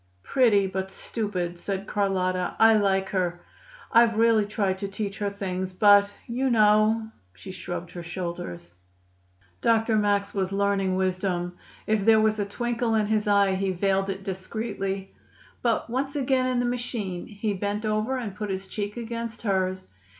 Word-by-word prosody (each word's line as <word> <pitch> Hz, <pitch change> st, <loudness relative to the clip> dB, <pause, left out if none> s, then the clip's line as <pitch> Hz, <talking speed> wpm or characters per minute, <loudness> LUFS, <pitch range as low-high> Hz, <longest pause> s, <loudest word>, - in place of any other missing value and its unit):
"Pretty, 220 Hz, -, +3 dB
but 190 Hz, 0 st, -3 dB
stupid," 185 Hz, -4 st, -3 dB
said 195 Hz, +1 st, -3 dB
Carlotta. 185 Hz, -3 st, 0 dB
"I 225 Hz, 0 st, +7 dB
like 195 Hz, -2 st, +2 dB
her. 175 Hz, -2 st, -1 dB, 0.5 s
I've 230 Hz, -1 st, +5 dB
really 225 Hz, -2 st, +4 dB
tried 195 Hz, -3 st, -1 dB
to 200 Hz, -, -3 dB
teach 195 Hz, 0 st, -5 dB
her 205 Hz, -1 st, 0 dB
things, 185 Hz, -2 st, -4 dB
but 205 Hz, +1 st, +6 dB, 0.2 s
you 255 Hz, +3 st, -1 dB
know 220 Hz, 0 st, +3 dB
" 90 Hz, 0 st, -38 dB
She 90 Hz, -, -9 dB
shrugged 175 Hz, -1 st, -6 dB
her 175 Hz, -, -7 dB
shoulders. 165 Hz, -, -6 dB, 0.9 s
Dr. 225 Hz, -1 st, +3 dB
Max 205 Hz, -1 st, +1 dB
was 190 Hz, -2 st, -1 dB
learning 195 Hz, -1 st, +1 dB
wisdom. 185 Hz, -1 st, -1 dB, 0.3 s
If 215 Hz, -2 st, +1 dB
there 220 Hz, +1 st, +6 dB
was 215 Hz, 0 st, +2 dB
a 205 Hz, -, 0 dB
twinkle 235 Hz, +1 st, -1 dB
in 215 Hz, -1 st, +2 dB
his 215 Hz, 0 st, 0 dB
eye, 200 Hz, -1 st, +4 dB
he 190 Hz, +1 st, 0 dB
veiled 195 Hz, +1 st, 0 dB
it 195 Hz, 0 st, -4 dB
discreetly. 195 Hz, 0 st, -4 dB, 0.5 s
But, 235 Hz, -2 st, +1 dB
once 270 Hz, +4 st, -2 dB
again 260 Hz, -2 st, +1 dB
in 255 Hz, -1 st, 0 dB
the 245 Hz, -, +1 dB
machine, 235 Hz, -7 st, -3 dB
he 210 Hz, 0 st, -3 dB
bent 205 Hz, +2 st, -3 dB
over 215 Hz, +5 st, 0 dB
and 220 Hz, -6 st, -5 dB
put 210 Hz, 0 st, -4 dB
his 190 Hz, 0 st, -3 dB
cheek 205 Hz, +2 st, -4 dB
against 230 Hz, 0 st, -5 dB
hers. 190 Hz, -3 st, 0 dB
200 Hz, 165 wpm, -26 LUFS, 190-220 Hz, 0.9 s, I